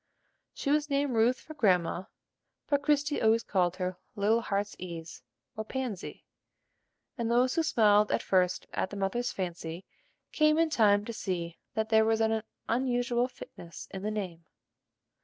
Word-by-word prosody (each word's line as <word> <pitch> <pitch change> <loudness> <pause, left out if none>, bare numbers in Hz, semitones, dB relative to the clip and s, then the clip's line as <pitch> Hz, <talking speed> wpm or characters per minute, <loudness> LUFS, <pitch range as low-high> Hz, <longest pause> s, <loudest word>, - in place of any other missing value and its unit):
She 280 - -1
was 300 0 +2
named 280 -1 +1
Ruth 235 +3 +3
for 310 - -10
grandma, 185 - +2 0.6
but 285 -1 +1
Christie 295 0 +1
always 225 +1 +4
called 180 -2 +1
her 185 -1 -3 0.2
"Little 215 +3 +2
Heart's 200 -1 -2
ease," 170 -2 -7 0.3
or 220 - -3
"Pansy," 245 -5 -5 0.9
and 230 -1 0
those 250 +2 +3
who 330 - +2
smiled 210 -9 +4
at - - 0
first 185 -1 +1
at - - -1
the 205 - -7
mother's 240 +6 -1
fancy, 175 -1 -5 0.5
came 305 0 +3
in 325 -1 +2
time 210 -6 +4
to 230 - -5
see 175 -5 -4 0.2
that 220 0 -1
there 220 -1 +5
was 225 0 +2
an 220 0 +2 0.3
unusual 245 0 +1
fitness 175 -9 -11
in 190 - -6
the 210 - -2
name. 185 -6 -5
220 Hz, 160 wpm, -30 LUFS, 190-250 Hz, 0.9 s, there